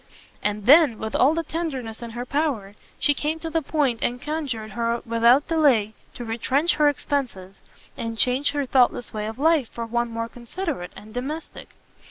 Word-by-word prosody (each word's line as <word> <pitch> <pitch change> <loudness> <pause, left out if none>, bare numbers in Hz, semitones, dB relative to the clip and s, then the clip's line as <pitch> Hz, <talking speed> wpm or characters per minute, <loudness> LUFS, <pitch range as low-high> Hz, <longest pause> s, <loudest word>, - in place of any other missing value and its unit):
And 210 0 -2
then, 285 -3 +7
with 220 0 -5
all 285 +5 +4
the 330 - -1
tenderness 270 -10 -4
in 235 - -6
her 245 - -3
power, 260 -9 -1 0.2
she 290 - +3
came 300 +3 -2
to 325 0 -6
the 325 0 +1
point, 275 -6 0
and 245 +1 0
conjured 265 -8 -4
her 235 +2 -1
without 235 +4 +4
delay 270 -10 +3 0.2
to 240 - -6
retrench 265 +8 0
her 300 -1 +5
expences, 250 -10 -3 0.3
and 230 0 -4
change 255 +5 +2
her 285 -1 -1
thoughtless 245 -2 +2
way 215 -1 -3
of 220 - -6
life 305 -3 +2
for 235 - -5
one 235 +1 -1
more 230 0 -3
considerate 245 - -5
and 215 +1 -12
domestic. 290 +6 -6
250 Hz, 180 wpm, -24 LUFS, 230-295 Hz, 0.3 s, then